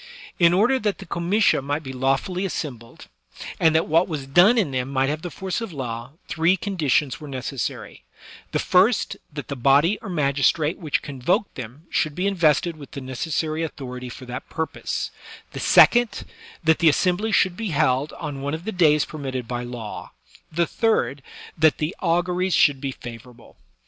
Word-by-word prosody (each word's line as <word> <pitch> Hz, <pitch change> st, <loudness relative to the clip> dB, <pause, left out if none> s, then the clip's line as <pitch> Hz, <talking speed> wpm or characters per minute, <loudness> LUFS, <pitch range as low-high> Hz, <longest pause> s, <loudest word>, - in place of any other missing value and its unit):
In 170 Hz, -1 st, +6 dB
order 225 Hz, +9 st, +3 dB
that 205 Hz, -5 st, -1 dB
the -, -, -10 dB
comitia 175 Hz, +2 st, +2 dB
might 145 Hz, +3 st, -3 dB
be 130 Hz, -1 st, -7 dB
lawfully 135 Hz, +8 st, 0 dB
assembled, 130 Hz, -, -6 dB, 0.5 s
and 160 Hz, -1 st, +4 dB
that 160 Hz, -, +2 dB
what 165 Hz, +3 st, +3 dB
was 150 Hz, -6 st, -4 dB
done 180 Hz, -, +5 dB
in 195 Hz, -11 st, +1 dB
them 130 Hz, 0 st, -2 dB
might 135 Hz, 0 st, +1 dB
have 150 Hz, +1 st, -2 dB
the 175 Hz, -, -5 dB
force 190 Hz, +5 st, -4 dB
of 225 Hz, -4 st, -5 dB
law, 125 Hz, -3 st, -6 dB
three 170 Hz, +3 st, +2 dB
conditions 155 Hz, -8 st, 0 dB
were 150 Hz, -, -9 dB
necessary; 130 Hz, -, -5 dB, 0.5 s
the -, -, 0 dB
first, -, -, +3 dB, 0.2 s
that -, -, -7 dB
the 140 Hz, -, -4 dB
body 140 Hz, -, +3 dB
or 210 Hz, -, -8 dB
magistrate 150 Hz, 0 st, +1 dB
which 155 Hz, -5 st, -1 dB
convoked 140 Hz, +8 st, -1 dB
them 130 Hz, +4 st, -9 dB
should 155 Hz, -2 st, 0 dB
be 185 Hz, -, -1 dB
in 200 Hz, -, +1 dB
vested 160 Hz, -1 st, +2 dB
with 145 Hz, -2 st, -11 dB
the -, -, -5 dB
necessary 155 Hz, +4 st, -2 dB
authority 125 Hz, -5 st, -6 dB
for 130 Hz, +2 st, -10 dB
that 125 Hz, +1 st, -7 dB
purpose; 160 Hz, -1 st, -3 dB, 0.4 s
the -, -, -7 dB
second, 240 Hz, -2 st, +5 dB, 0.4 s
that 160 Hz, 0 st, +3 dB
the 165 Hz, -, +6 dB
assembly 185 Hz, +7 st, +1 dB
should 185 Hz, -3 st, +3 dB
be 220 Hz, 0 st, -4 dB
held 145 Hz, -2 st, +1 dB
on 145 Hz, -4 st, -6 dB
one 145 Hz, +2 st, -2 dB
of 165 Hz, +3 st, -9 dB
the 220 Hz, -, -2 dB
days 150 Hz, -6 st, +3 dB
i)ermitted 130 Hz, -5 st, -5 dB
by 120 Hz, 0 st, -3 dB
law; 120 Hz, -3 st, -7 dB, 0.4 s
the 170 Hz, +2 st, +1 dB
third, 145 Hz, -, 0 dB, 0.3 s
that 155 Hz, -1 st, +4 dB
the 155 Hz, +4 st, -2 dB
auguries 180 Hz, 0 st, +1 dB
shotald 140 Hz, -2 st, +4 dB
be 135 Hz, -, -2 dB
favorable. 120 Hz, -1 st, -12 dB
155 Hz, 180 wpm, -23 LUFS, 135-175 Hz, 0.5 s, In